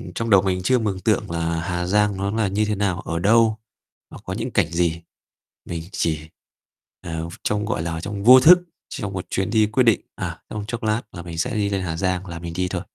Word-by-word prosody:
trong 115 0 -2
đầu 100 -3 +6
mình 95 -2 -1
chưa 130 +5 +3
mường 100 -4 -2
tượng 90 - 0
là 85 0 -1
Hà 90 +1 -2
Giang 105 +1 +2
nó 100 +1 -1
là 110 -1 0
như 105 +3 0
thế 105 0 -1
nào? 95 -3 -1
Ở 85 -3 -3
đâu? 110 +3 +4 0.6
Nó - - -9
có - - -5
những - - -3
cảnh - - +2
gì? 85 -1 0 0.6
Mình 85 -2 -5
chỉ, 80 -5 0 0.8
ờ, 80 -1 -4
ph 85 - -9
trong, 105 0 0
gọi 110 -6 -2
là, 80 -1 -3
trong 100 +2 -5
vô 125 +2 +9
thức, 175 +6 +8 0.3
trong 105 -7 -5
một 95 -2 -5
chuyến 95 +2 -1
đi 110 -1 +3
quyết 115 +5 +2
định, 115 -3 +4
à, - - -5
trong 105 -1 -4
chốc 120 -1 -4
lát 110 +1 0
là 85 - -7
mình 85 -1 -8
sẽ 125 +7 -1
đi 105 -2 0
lên 100 -1 -1
Hà 85 -3 -3
Giang 90 +1 -1
là 85 -1 -6
mình 85 0 -6
đi 90 +2 -1
thôi. 90 -1 -3
95 Hz, 240 wpm, -22 LUFS, 85-110 Hz, 0.8 s, vô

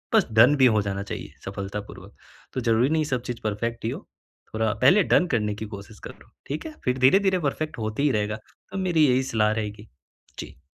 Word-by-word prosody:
बस 215 - +5
डन 120 +6 +6
भी 130 - +5
हो 110 -4 +4
जाना 100 -1 -3
चाहिए 100 - -7
सफलतापूर्वक, 100 +1 -7 0.4
तो 130 - -2
ज़रूरी 115 +2 +2
नहीं 160 0 +1
सब 125 -4 -2
चीज़ 120 -2 -6
परफेक्ट 115 +2 -3
ही - - +1
हो, - - -5 0.5
थोड़ा 110 -1 +1
पहले 185 +10 +6
डन 180 - +3
करने 105 -2 -1
की 110 - -6
कोशिश 100 +2 -12
करो। - - -12 0.2
ठीक 145 +3 -4
है? 315 - -7
फिर 125 +1 +1
धीरे-धीरे 190 +8 +4
परफेक्ट 155 0 -3
होता 110 +5 -2
ही 145 - +3
रहेगा 105 0 -1 0.3
तो 195 - -5
मेरी 175 -6 +3
यही 130 +1 +2
सलाह 110 -4 +1
रहेगी। 105 -1 -4 0.5
जी। 70 - -9
115 Hz, 200 wpm, -25 LUFS, 105-145 Hz, 0.5 s, डन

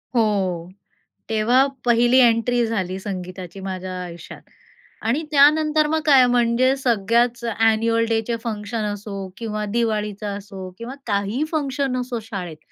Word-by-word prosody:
हो. 190 -6 0 0.6
तेव्हा 230 +5 +3 0.2
पहिली 240 +2 +4
एंट्री 240 0 +3
झाली 190 -5 -2
संगीताची 185 -1 -7
माझ्या 185 -1 -5
आयुष्यात. 170 -1 -10 0.6
आणि 255 +8 +1
त्यानंतर 305 +1 +4
मग 315 +1 +1
काय 270 -4 +7
म्हणजे 245 +2 +3
सगळ्याच 235 0 +1
अ‍ॅन्युअल 225 +1 +2
डे 225 0 +2
चे 235 - 0
फंक्शन 215 0 -3
असो 200 -2 -6
किंवा 215 -2 -3
दिवाळीचा 215 -3 -1
असो 195 -2 -8
किंवा 235 +3 -7
काहीही 205 +6 0
फंक्शन 275 -4 -1
असो 245 -2 -3
शाळेत. 190 -8 -6
225 Hz, 125 wpm, -22 LUFS, 200-245 Hz, 0.6 s, काय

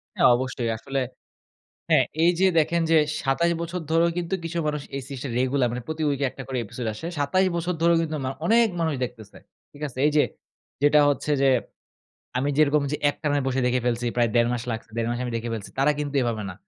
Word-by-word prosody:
হ্যাঁ - - +5
অবশ্যই 125 -2 -2
আসলে 135 +3 -3 0.9
হ্যাঁ - - +5 0.2
এই 175 - +6
যে 190 - +4
দেখেন 170 +2 +1
যে 160 - +6 0.2
২৭ 170 +6 +1
বছর 170 +2 -3
ধরেও 165 +1 +4
কিন্তু 175 +1 -2
কিছু 170 +1 -4
মানুষ 150 -1 -2
এই 135 - -3
সিরিজ 135 -3 -7
টা 135 - -4
রেগুলার 130 -1 +2
মানে 125 +1 -4
প্রতি 160 0 -4
উইকে 140 0 0
১টা 135 - -8
করে 130 -1 -3
episode 120 +3 -5
আসে। 160 +10 -6
২৭ 165 +7 +2
বছর 175 +1 -1
ধরেও 170 0 +4
কিন্তু 155 -1 -2
মা 130 - -1 0.2
অনেক 230 +3 +5
মানুষ 160 -2 +1
দেখতেছে, 115 -4 -8 0.3
ঠিক 145 - -15
আছে? 130 -1 -9
এই 150 - +4
যে - - +6 0.6
যেটা 150 +1 +6
হচ্ছে 145 +1 -1
যে 135 - +4 0.9
আমি 140 +3 0
যেরকম 150 -1 +4
যে - - +1
একটানে 145 -1 -1
বসে 135 0 0
দেখে 125 0 +1
ফেলছি 120 0 0
প্রায় 120 -1 +3
১.৫ 120 0 +4
মাস 120 -2 -2
লাগছে, 110 -1 -7
১.৫ 115 0 0
মাসে 120 +1 -2
আমি 120 - -4
দেখে 115 +1 -4
ফেলছি, 105 -2 -7
তারা 140 +2 +4
কিন্তু 145 -1 -3
এভাবে 115 -3 -1
না। 90 - -8
140 Hz, 215 wpm, -25 LUFS, 125-160 Hz, 0.9 s, এই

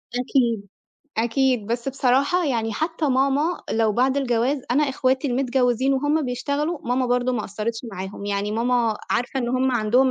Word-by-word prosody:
أكيد، 240 -4 0 0.5
أكيد، 240 -1 +1
بس 235 +3 -2
بصراحة 275 +6 +2
يعني 225 -5 -1
حتّى 320 +4 -1
ماما 275 +6 +1
لو 220 -1 +2
بعد 260 +5 +2
الجواز 260 +1 +1
أنا 290 +4 +3
إخواتي 260 +1 0
المتجوّزين 255 0 +1
وهُم 290 +3 +1
بيشتغلوا 285 +6 -2
ماما 250 +1 0
برضه 245 +1 +1
ما 230 -3 -1
قصّرتش 215 +3 -4
معاهم، 190 +1 -6
يعني 205 +1 -1
ماما 235 -1 +1
عارفة 245 +2 0
إن 240 - -2
هم 255 +1 +1
عندهم 245 +3 +3
250 Hz, 155 wpm, -23 LUFS, 230-270 Hz, 0.5 s, أنا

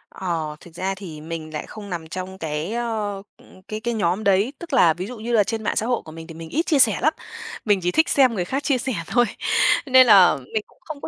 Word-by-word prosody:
Ờ, 165 -5 -3
thực 170 - -15
ra 190 +2 -3
thì 165 -6 -9
mình 160 -1 -7
lại 150 - -4
không 205 -2 -10
nằm 170 -3 -5
trong 185 +2 -6
cái, 160 +4 -4
ơ, 215 -4 -3 0.2
ừm, 185 - -19
cái 215 - -5
cái 235 +1 -2
nhóm 205 -1 0
đấy, 200 +6 +2
tức 335 -4 -9
là 175 -11 +5
ví 180 +4 -6
dụ 250 - -8
như 225 +2 -5
là 215 - +5
trên 225 +2 -4
mạng - - -1
xã 220 - 0
hội 245 0 0
của 155 - -10
mình 160 0 -10
thì 165 - -9
mình 165 0 -9
ít 325 +3 -1
chia 300 -4 +2
sẻ 225 -5 +5
lắm. 310 - +3 0.5
Mình 205 -3 +3
chỉ 180 - +1
thích 315 - +2
xem 260 -4 +4
người 180 -4 -2
khác 270 +8 -3
chia 275 - +2
sẻ 260 +1 -3
thôi. 240 0 +3 0.6
Nên 260 -2 +6
là 195 -4 +7 0.2
mình 215 -2 0
cũng - - -26
không 300 -2 -9
có - - -5
205 Hz, 265 wpm, -22 LUFS, 175-240 Hz, 0.6 s, là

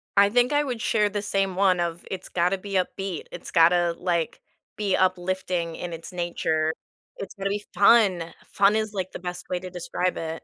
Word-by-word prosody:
I 200 0 +6
think 245 +4 +3
I 295 0 +3
would 245 -5 -4
share 210 -2 +2
the 205 0 -3
same 195 -2 -1
one 185 -2 +3
of, 170 0 -3
it's 190 - -6
gotta 180 +2 +1
be 200 +1 -8
upbeat. 190 -2 -2
It's - - -8
gotta, 170 0 +4
like, 170 -3 -1 0.4
be 200 -3 +1
uplifting 185 -2 0
in 175 -1 -6
its 165 +3 -8
nature. 160 -2 0 0.4
It's 195 - -7
gonna 195 0 -2
be 205 +1 -3
fun! 200 -6 +4 0.2
Fun 200 +2 +4
is, 215 -1 -1
like, 190 -2 -3
the - - -7
best 180 0 -6
way 180 - -1
to 185 0 -8
describe 180 +1 -2
it. 160 0 -5
185 Hz, 195 wpm, -25 LUFS, 175-200 Hz, 0.4 s, I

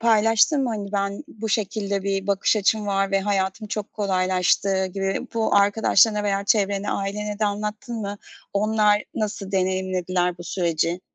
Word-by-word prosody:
paylaştın 225 +5 +4
mı? 250 - 0
Hani, 205 -2 -5
ben 200 +6 -2
bu 220 -6 -6
şekilde 200 -1 -1
bir 195 0 -2
bakış 200 +2 +2
açım 210 +1 +1
var 195 -1 0
ve 195 0 +2
hayatım 195 +1 -1
çok 210 0 -4
kolaylaştı 190 -1 +1
gibi. 195 +5 -3
Bu 225 -1 +1
arkadaşlarına 210 +1 +4
veya 200 -1 0
çevrene, 200 -1 +1
ailene 205 +1 -3
de 215 - +1
anlattın 210 +3 -3
mı? 205 -1 -5 0.3
Onlar 210 0 +2
nasıl 205 -2 -3
deneyimlediler 185 -1 0
bu 175 - -8
süreci? 170 -1 -1
200 Hz, 150 wpm, -23 LUFS, 195-210 Hz, 0.3 s, paylaştın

